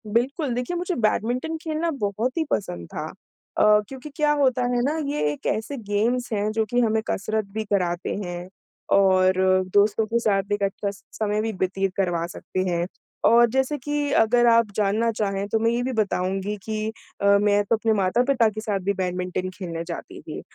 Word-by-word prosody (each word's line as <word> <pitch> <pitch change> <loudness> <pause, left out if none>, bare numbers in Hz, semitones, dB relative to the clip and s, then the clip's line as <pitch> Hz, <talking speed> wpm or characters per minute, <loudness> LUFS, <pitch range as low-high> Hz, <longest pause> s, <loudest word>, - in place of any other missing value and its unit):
बिल्कुल, 250 - 0
देखिए 250 +8 -2
मुझे 355 +1 -2
बैडमिंटन 245 +7 0
खेलना 320 +1 -1
बहुत 215 - -1
ही 325 - +2
पसंद 85 - -2
था - - -3 0.5
अ, - - +4 0.2
क्योंकि 265 +4 -9
क्या 300 -1 +2
होता 255 -2 +2
है 245 - +2
ना 295 +5 0
ये 295 - -2
एक 145 - -9
ऐसे 225 +6 -2
गेम्स 230 +3 -1
हैं, 210 0 0
जो 220 0 0
कि 245 +3 0
हमें 220 -1 +2
कसरत 215 +2 -1
भी 220 0 -2
कराते 180 -4 -1
हैं 175 0 -6 0.5
और 185 -1 +4 0.4
दोस्तों 210 +2 +3
के 230 +2 0
साथ 200 -3 0
एक 205 -1 -1
अच्छा 200 +1 -1
स 200 - -15
समय 210 -1 -1
भी 225 +1 -1
व्यतीत 190 -1 -1
करवा 175 -3 0
सकते 185 0 -6
हैं। 170 -1 0 0.4
और 235 0 +6
जैसे 265 +4 0
कि 290 +1 -2
अगर 240 +2 +4
आप 230 -2 +4
जानना 215 +3 +1
चाहें 200 -2 -2
तो 220 +2 0
मैं 230 +1 +2
ये 240 +1 0
भी 260 - -1
बताऊँगी 195 -1 -1
कि 215 -1 -3 0.3
अ, - - 0 0.2
मैं 205 0 +3
तो 215 +3 +2
अपने 220 0 +1
माता-पिता 230 +5 +2
के 215 0 -6
साथ 210 -3 -1
भी 200 - +2
बैडमिंटन 185 -1 -2
खेलने 170 -4 -4
जाती 170 - -7
थी, - - -7
215 Hz, 190 wpm, -24 LUFS, 195-240 Hz, 0.5 s, और